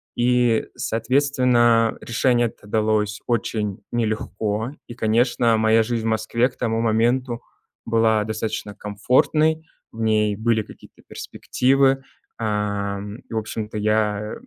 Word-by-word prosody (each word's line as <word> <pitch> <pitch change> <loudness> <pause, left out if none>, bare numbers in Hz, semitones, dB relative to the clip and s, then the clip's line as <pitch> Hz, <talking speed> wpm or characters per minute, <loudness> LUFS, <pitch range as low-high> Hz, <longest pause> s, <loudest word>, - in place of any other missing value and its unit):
И, 120 -2 +2
соответственно, 120 -1 +2
решение 120 +1 +1
это 110 - -13
далось 105 0 0
очень 110 -4 -1
нелегко, 110 0 -2 0.2
и, 120 - -9
конечно, 115 +1 +2
моя 110 +1 +4
жизнь 115 0 -2
в - - +1
Москве 115 +3 +1
к 125 - -23
тому 115 -2 -1
моменту 120 +2 +1 0.4
была 115 -2 +2
достаточно 110 -1 -4
комфортной, 155 +9 +1 0.3
в 115 - -8
ней 105 -2 +2
были 110 +1 +1
какие-то - - -16
перспективы, 135 +1 +1 0.4
эм, 105 -1 -2
и, - - -14
в - - -1
общем-то, 110 0 -4
я 105 0 0
110 Hz, 120 wpm, -22 LUFS, 105-120 Hz, 0.4 s, моя